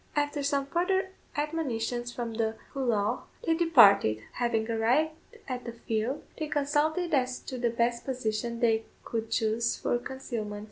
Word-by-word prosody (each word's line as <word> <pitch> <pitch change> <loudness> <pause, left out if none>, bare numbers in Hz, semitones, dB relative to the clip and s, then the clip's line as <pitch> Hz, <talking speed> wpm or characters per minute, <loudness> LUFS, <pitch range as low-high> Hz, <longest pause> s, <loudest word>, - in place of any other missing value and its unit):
After 290 0 0
some 280 0 +1
further 375 +5 0 0.3
admonitions 245 -6 -1
from 235 -2 -4
the 220 0 0 0.2
Collough, 235 -4 0 0.2
they 330 - +3
departed. 205 - +6
Having 230 -2 0
arrived 245 +8 +2 0.4
at 250 -2 -4
the 235 - -6
field, 230 +3 -2 0.2
they 310 - -1
consulted 300 +4 +1
as 255 -2 +2
to 255 - -6
the 240 -1 +2
best 235 +1 0
position 235 -2 -2
they 225 -2 +3 0.2
could 225 -1 -3
chose 225 0 +1
for 240 - 0
concealment. 235 -5 -5
240 Hz, 145 wpm, -29 LUFS, 225-290 Hz, 0.4 s, departed